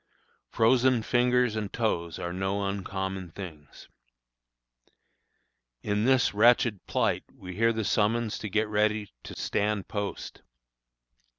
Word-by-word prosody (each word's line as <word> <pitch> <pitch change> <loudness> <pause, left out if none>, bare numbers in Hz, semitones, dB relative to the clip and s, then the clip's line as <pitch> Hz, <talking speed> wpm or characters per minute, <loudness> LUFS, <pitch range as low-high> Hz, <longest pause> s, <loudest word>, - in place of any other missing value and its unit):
Frozen 120 +1 +3
fingers 125 -1 +2
and 105 -2 -3
toes 85 -8 -1
are 85 0 -4
no 95 +2 -1
uncommon 95 -1 -4
things. 80 -5 -10 2.0
In 105 +1 0
this 130 -1 +3
wretched 115 -1 +4
plight - - 0
we 90 -1 -10
hear 115 +2 +3
the 110 -2 -2
summons 110 +2 +1
to 105 - -5
get 110 +2 +1
ready 105 -1 0
to - - -9
stand 105 -1 -1
post. 100 -1 -5
105 Hz, 115 wpm, -28 LUFS, 95-115 Hz, 2.0 s, wretched